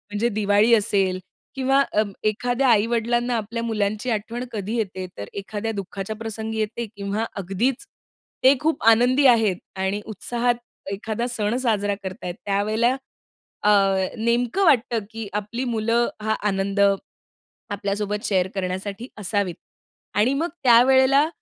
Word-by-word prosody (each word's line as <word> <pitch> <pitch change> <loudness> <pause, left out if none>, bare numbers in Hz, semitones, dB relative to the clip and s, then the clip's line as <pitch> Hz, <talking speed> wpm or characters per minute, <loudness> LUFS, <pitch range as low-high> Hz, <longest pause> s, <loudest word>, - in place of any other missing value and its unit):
म्हणजे 210 +3 0
दिवाळी 205 +2 +4
असेल 195 -3 +1 0.4
किंवा 270 +1 +3
अ, 210 - +4 0.2
एखाद्या 245 +5 +1
आई-वडिलांना 235 +2 +2
आपल्या 230 +2 -4
मुलांची 215 +1 -1
आठवण 225 +3 -3
कधी 215 0 -3
येते, 190 -4 -3
तर 100 - -6
एखाद्या 205 +2 -4
दुःखाच्या 195 +2 -5
प्रसंगी 220 0 -5
येते 220 +2 -2
किंवा 200 +2 -2 0.2
अगदीच 230 - -1 0.6
ते 265 - +8
खूप 315 -1 -1
आनंदी 250 +5 +4
आहेत 220 -7 +4 0.2
आणि 190 +2 -1
उत्साहात 240 +2 -1 0.4
एखादा 220 +4 -3
सण 220 -2 -1
साजरा 210 -5 0
करत 190 +3 -7
आहेत, 175 -1 -4
त्यावेळेला 215 +5 +1 0.7
अ, 210 - +4 0.5
नेमकं 235 - +1
वाटतं, 245 -6 +3
की 225 -2 -6
आपली 215 +5 -4
मुलं 230 +1 +1 0.2
हा 220 0 +1
आनंद 195 0 -1 0.9
आपल्यासोबत 205 0 -2
शेअर 185 -2 +1
करण्यासाठी 195 +4 -4
असावीत. 200 -2 -1 0.6
आणि 215 +6 +3
मग 320 +5 0
त्यावेळेला 265 +4 +5
220 Hz, 130 wpm, -23 LUFS, 205-240 Hz, 0.9 s, ते